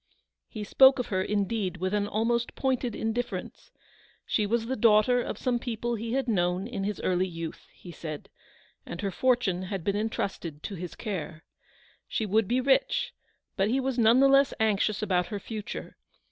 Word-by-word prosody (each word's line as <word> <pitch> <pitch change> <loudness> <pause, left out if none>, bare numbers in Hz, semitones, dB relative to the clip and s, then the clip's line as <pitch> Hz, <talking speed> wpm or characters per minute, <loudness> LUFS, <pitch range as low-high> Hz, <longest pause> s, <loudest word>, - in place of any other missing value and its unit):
He 215 - -6
spoke 265 +5 +6
of 250 -2 -3
her, 185 -3 0
indeed, 200 -1 -1
with 185 +2 -2
an 205 -1 +1
almost 230 +3 0
pointed 255 -3 -1
indifference. 225 +2 -4 0.6
She 210 -2 +1
was 230 +1 0
the 260 +3 -2
daughter 225 +2 +4
of - - -4
some 245 -2 0
people 240 -1 -3
he 230 +1 -3
had 270 -1 0
known 180 -3 +1
in 210 -4 -4
his 210 -1 -3
early 185 0 +1
youth, 165 -2 -7
he 175 - -12
said, 155 -3 -7 0.6
and 170 - -7
her 200 -1 -1
fortune 240 -5 +1
had 185 -1 -4
been 200 +2 0
entrusted 195 -7 -3
to - - -5
his 180 -2 -6
care. 170 -7 -5 0.6
She 220 - -1
273 200 - -7
would 220 -2 +4
be 250 +4 +1
rich, 485 - +2 0.4
but 195 - +2
be 250 +5 +1
was 260 -2 -1
none 230 +2 +6
the 275 - +7
less 275 0 +4
anxious 215 -1 +1
about 180 -4 +1
her 205 - -4
future. 215 +1 -7
215 Hz, 185 wpm, -28 LUFS, 190-240 Hz, 0.6 s, the